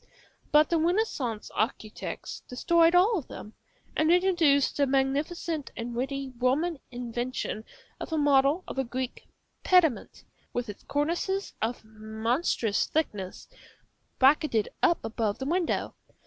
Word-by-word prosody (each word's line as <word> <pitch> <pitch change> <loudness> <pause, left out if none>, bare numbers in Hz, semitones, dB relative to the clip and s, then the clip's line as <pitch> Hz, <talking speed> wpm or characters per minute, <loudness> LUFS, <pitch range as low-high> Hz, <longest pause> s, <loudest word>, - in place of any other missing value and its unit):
But 300 +2 +5
the 335 - +3
Renaissance 315 - -1
architects 215 -1 -3
destroyed 335 +6 +3
all 390 +3 +4
of 280 - -11
them, 210 - -9 0.4
and 315 +1 +3
introduced 345 -6 +3
the 285 -1 +3
magnificent 285 +4 -1
and 240 0 -4
witty 270 +2 -3
Roman 285 +6 +1
invention 240 -2 -4 0.3
of - - -6
a 320 - 0
model 290 +3 +3
of - - -5
a - - +2
Greek 255 +1 -5 0.4
pediment, 340 -9 +2 0.3
with 245 -2 -3
its 205 - -8
cornices 345 +7 -1
of 225 0 -2
monstrous 220 +2 -1
thickness, 205 -12 -3 0.7
bracketed 265 -5 +3
up 340 - +2
above 220 -2 -1
the 265 - -5
window. 340 +3 0
275 Hz, 125 wpm, -28 LUFS, 240-330 Hz, 0.7 s, But